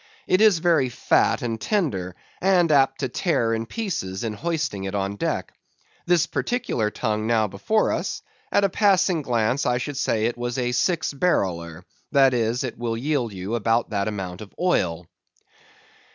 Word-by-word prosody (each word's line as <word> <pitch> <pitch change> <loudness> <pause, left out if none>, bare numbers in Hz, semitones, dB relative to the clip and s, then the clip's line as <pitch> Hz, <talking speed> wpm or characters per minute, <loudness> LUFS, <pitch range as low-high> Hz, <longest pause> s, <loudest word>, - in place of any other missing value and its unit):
It 185 - +2
is 215 -5 +6
very 165 -6 +2
fat 120 - +1
and 115 -2 -3
tender, 100 - -1 0.3
and 180 -3 +3
apt 135 -2 +3
to 135 - 0
tear 120 - 0
in 115 0 -2
pieces 120 - -4
in 110 -2 -2
hoisting 145 - -2
it 95 +1 -4
on 100 0 -2
deck. - - -3 0.5
This 175 -2 +4
particular 175 - -1
tongue 110 -1 -2
now 115 -2 +3
before 215 - 0
us; - - -3 0.3
at 200 - +3
a 200 - +3
passing 190 -4 +3
glance 120 0 0
I 125 0 +2
should 130 +3 -4
say 110 -5 0
it 120 +1 -2
was 120 +1 -3
a 125 -1 0
six 160 +6 0
barreler; 90 - -1 0.3
that 135 -2 +5
is, 120 +2 0
it 125 -3 -5
will 115 -1 -2
yield 130 -3 -1
you 95 +2 -5
about 115 +1 +1
that 100 -1 -1
amount 95 -3 -5
of 105 - -10
oil. 90 - 0
120 Hz, 170 wpm, -24 LUFS, 105-160 Hz, 0.5 s, is